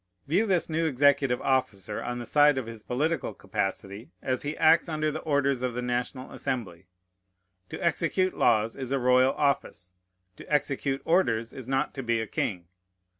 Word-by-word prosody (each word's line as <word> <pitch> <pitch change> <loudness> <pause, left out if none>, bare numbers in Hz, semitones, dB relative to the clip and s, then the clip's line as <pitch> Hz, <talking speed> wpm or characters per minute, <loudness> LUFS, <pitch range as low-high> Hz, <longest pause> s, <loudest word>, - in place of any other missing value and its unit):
View 190 +10 +1
this 185 -4 +2
new 165 0 0
executive 140 -2 +3
officer 105 -7 -1
on 120 0 -4
the 120 - -6
side 145 +2 +4
of 130 - -2
his 115 -1 -8
political 125 - -2
capacity, 100 +4 -4
as 130 -1 -2
he 145 +2 -4
acts 165 +2 +4
under 155 -1 -1
the 155 - -4
orders 140 -4 +1
of 125 -2 -2
the 125 - -2
National 125 +1 -3
Assembly. 95 -8 -4 0.8
To - - -6
execute 180 +2 0
laws 110 -1 +2
is 130 -2 -5
a 140 - +2
royal 125 +1 +4
office; 135 -10 -1 0.4
to - - -12
execute 140 -1 0
orders 120 -10 +1
is 130 -3 -9
not 135 +2 0
to 135 - -5
be 115 -2 0
a 110 - -2
king. 90 -4 -3
130 Hz, 175 wpm, -27 LUFS, 115-150 Hz, 0.8 s, side